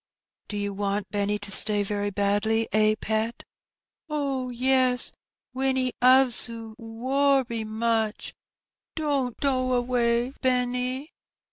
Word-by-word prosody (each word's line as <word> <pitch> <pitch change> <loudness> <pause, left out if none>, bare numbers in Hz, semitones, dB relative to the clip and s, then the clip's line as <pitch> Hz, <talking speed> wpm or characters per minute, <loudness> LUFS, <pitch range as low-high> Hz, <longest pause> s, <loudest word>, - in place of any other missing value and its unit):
" - - -62
Do 210 - -5
you 205 0 -3
want 200 0 -3
Benny 205 0 -1
to 205 -1 -7
stay 205 +1 +7
very 205 0 -3
badly, 205 +3 0
eh, 215 0 +3
pet? 220 +2 -3 0.4
" - - -68 0.2
"Oh, 275 -4 -3
yes, 255 0 +1 0.4
Winnie 260 -1 -1
'oves 255 -1 +5
'oo 225 -1 -9
werry 250 +1 0
much; 220 0 -2 0.6
don't 280 -6 -2
do 255 -2 0
away, 245 0 0
Benny." 250 +2 -1
235 Hz, 120 wpm, -25 LUFS, 215-260 Hz, 0.6 s, stay